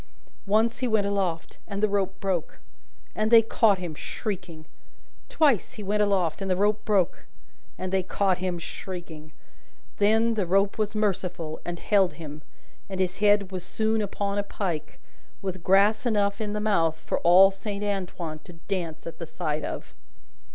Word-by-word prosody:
Once, 220 +3 +2
he 255 - 0
went 220 -3 +2
aloft, 190 -5 -2
and 200 0 -4
the - - +6
rope 195 -2 -1
broke, 185 -5 -2 0.5
and 215 0 0
they 230 -1 +8
caught 220 -2 +3
him 175 -3 -5
shrieking; 175 -2 -5 0.6
twice, 280 - +2
he 210 - -8
went 210 +2 +1
aloft, 195 -5 +1
and 195 - -3
the 185 - +3
rope 210 +3 +1
broke, 195 -5 +1 0.5
and 185 0 -4
they 190 - +3
caught 190 0 0
him 180 -1 -2
shrieking; 165 -2 -8 0.7
then, 220 +3 +4
the 205 -5 -1
rope 195 +4 +2
was 215 0 -1
merciful, 180 -6 -2
and 175 0 -4
held 195 -1 +2
him, 155 -2 -9 0.5
and 190 -1 -5
his 185 -1 0
head 205 -2 +3
was 185 -2 -4
soon 220 +3 0
upon 200 0 -2
a - - 0
pike, 175 -7 -4 0.4
with 185 -2 -5
grass 200 +5 +4
enough 200 -2 +1
in 210 -1 -2
the 210 - -1
mouth 165 -7 +1
for - - -2
all 185 +3 +7
Saint 200 +1 -5
Antoine 180 -6 -3
to 175 - -13
dance 175 -5 -3
at 165 - -8
the 165 - -6
sight 155 -3 -3
of. - - -6
195 Hz, 170 wpm, -26 LUFS, 175-210 Hz, 0.7 s, they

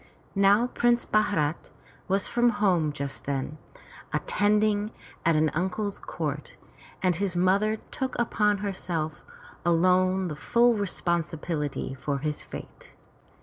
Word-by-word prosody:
'* - - -32
Now 200 +3 +5
Prince 240 -1 +1
Bharat 170 -8 +1 0.4
was 195 +1 +2
from 240 0 +3
home 180 -9 +2
just 140 -2 -5
then, 140 +2 -3 0.5
attending 210 +1 +2 0.3
at 165 -1 +3
an 155 0 +3
uncle's 190 +4 -2
court, 150 -3 -4 0.5
and 180 -2 +3
his 195 -3 -1
mother 195 +4 +3 0.2
took 260 0 -3
upon 210 -3 +2
herself 165 -5 -3 0.4
alone 185 +2 +3
the 155 - -4
full 235 +9 +3
responsibility 165 -8 -2
for 140 +1 -2
his 150 +1 -3
fate. - - -10
185 Hz, 120 wpm, -27 LUFS, 155-210 Hz, 0.5 s, Now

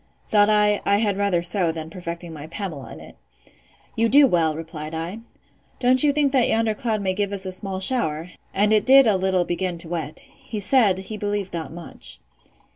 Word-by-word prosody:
—Thought 205 -1 +4
I, 210 -1 +3
I 200 - +2
had 205 -2 +1
rather 195 -4 0
so, 175 -1 +1
than 160 0 -7
perfecting 170 -1 -7
my 150 0 -9
Pamela 170 -5 -6
in - - -10
it.—You - - -7
do 285 +3 +7
well, 165 - +1
replied 160 -1 -7
I.—Don't 230 +7 -3
you 295 - +4
think 285 -1 +1
that 260 -3 +3
yonder 225 -1 +1
cloud 220 -2 -2
may 190 -1 0
give 200 +1 -2
us 195 -1 -4
a 185 - -3
small 190 0 -1
shower? 180 -7 0 0.2
and 210 +2 +2
it 210 -2 +4
did 270 0 +8
a 215 -3 +3
little 190 -1 +1
begin 175 0 -2
to 165 -1 -4
wet.—He 170 +6 -6
said, 205 -3 +3
he 195 +3 -7
believed 205 -2 -3
not 165 -2 -5
much. 160 - -5
190 Hz, 190 wpm, -23 LUFS, 165-215 Hz, 0.2 s, did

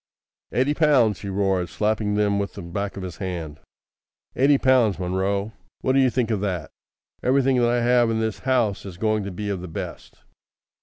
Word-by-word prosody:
"Eighty 130 +4 +1
pounds!" 140 - +3
he 100 - -6
roared, 95 -2 0
slapping 105 +2 0
them 105 -1 +2
with 100 - -3
the 100 - -7
back 100 +4 -4
of 95 - -5
his 90 -3 -7
hand. 85 -5 -5 0.8
"Eighty 140 +2 +4
pounds, 125 -7 +3
Munro! 95 +3 -1 0.3
What 130 - +1
d'ye 135 -1 +4
think 120 -2 -1
of 105 -3 0
that? 90 -7 -3 0.5
Everything 130 0 +2
that 120 -1 +3
I 120 0 +1
have 120 -1 +4
in 110 -1 0
this 110 -2 -2
house 125 -6 0
is 95 -3 -9
going 110 +1 0
to 100 - -4
be 105 +3 -4
of 95 -3 -3
the 90 - -7
best. 80 - -7
105 Hz, 190 wpm, -23 LUFS, 95-120 Hz, 0.8 s, Eighty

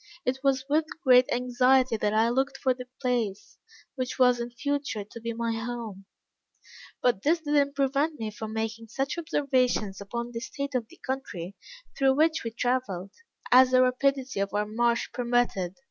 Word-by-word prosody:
It 260 +1 0
was 270 -1 +2
with 305 +2 +2 0.2
great 255 -2 +6
anxiety 250 0 +3
that 210 -1 0
I 220 +2 +3
looked 270 +2 0
for 260 -1 +1
the 250 0 -9
place, 235 -6 -2 0.3
which 255 -1 -4
was 250 -2 +4
in 235 0 -3
future 280 -3 -3
to 225 +3 -12
be 230 +1 -3
my 230 0 -2
home; 225 -4 -5 1.0
but 240 -6 +2
this 325 +6 +2
did 295 -2 -3
not 280 -1 +2
prevent 280 +2 0
me 220 -1 -3
from 215 +1 -7
making 225 +1 -4
such 270 +8 -2
observations 255 - 0
upon 235 +4 -5
the 230 - -4
state 280 +3 -5
of 245 -3 -1
the - - -17
country 200 -9 -4 0.4
through 270 -1 +3
which 315 +2 +2
we 230 - -2
traveled, 225 -6 -2 0.4
as 255 +1 +8
the 255 0 +5
rapidity 260 -1 0
of 200 +1 -2
our 210 0 +1
march 235 +2 0
permitted. 240 -7 0
250 Hz, 175 wpm, -27 LUFS, 225-270 Hz, 1.0 s, as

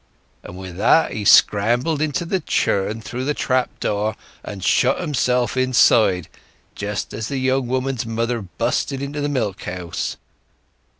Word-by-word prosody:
And 90 - -10
with 95 -2 -8
that 160 +10 +4
he 105 - -4
scrambled 120 +12 +4
into 155 +2 -1
the 190 +3 0
churn 110 - -1
through 125 +3 -5
the 145 +2 -1
trap 130 -1 -1
door, 105 +1 -1 0.3
and 100 -3 -7
shut 130 +7 +3
himself 125 -7 0
inside, 115 -8 +3 0.5
just 105 0 -4
as 110 0 -4
the 140 - -3
young 130 0 0
woman's 130 0 -1
mother 115 +1 -1
busted 120 +7 -2
into 140 +2 -4
the 145 - -1
milk 110 -9 -2
house. 90 -1 -4
120 Hz, 145 wpm, -21 LUFS, 105-135 Hz, 0.5 s, that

